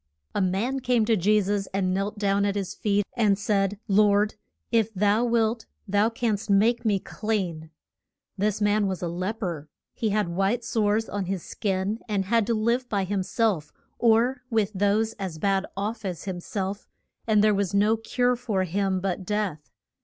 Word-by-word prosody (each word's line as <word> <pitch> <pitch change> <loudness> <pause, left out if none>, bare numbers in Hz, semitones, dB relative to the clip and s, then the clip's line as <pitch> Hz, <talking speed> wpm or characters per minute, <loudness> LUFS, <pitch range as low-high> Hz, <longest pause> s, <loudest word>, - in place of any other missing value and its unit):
A - - 0
man 200 +9 0
came 245 -3 +2
to 225 0 +3
Je 210 +3 +3
sus 200 0 -1
and 185 -2 +1
knelt 200 +3 -2
down 200 -1 +1
at 200 0 0
his 195 -3 -3
feet 205 -1 0
and 210 -5 +3
said, 200 -1 0
Lord, 205 0 +4 0.4
if 225 -2 +2
thou 205 +4 +3
wilt 230 -1 +1 0.2
thou 205 +3 +3
canst 225 -2 -2
make 225 +4 +3
me 210 -3 +2
clean. 185 -7 -3 0.7
This 210 +1 -1
man 205 0 +2
was 190 -1 -3
a - - 0
lep 185 +6 -3
er. 160 -5 -4 0.2
He 225 - -1
had 210 -3 0
white 195 +7 0
sores 225 -2 +1
on 200 -2 -3
his 185 -1 -3
skin, 200 +1 -2
and 200 -2 0
had 225 +1 +2
to 235 - +1
live 235 +3 0
by 200 -2 0
him 195 +1 -1
self 185 -6 0 0.3
or 240 +3 +3
with 220 -4 +1
those 205 +3 +1
as 185 -5 -4
bad 195 +3 +1
off 215 +3 -3
as 180 -4 -4
him 185 -3 -4
self, 195 +2 -4 0.4
and 215 -2 +4
there 215 0 +5
was 200 -1 -1
no 210 +3 +4
cure 245 +2 0
for 225 -6 -1
him 190 +1 -1
but 190 0 -2
death. 195 -6 -2
205 Hz, 185 wpm, -26 LUFS, 195-220 Hz, 0.7 s, there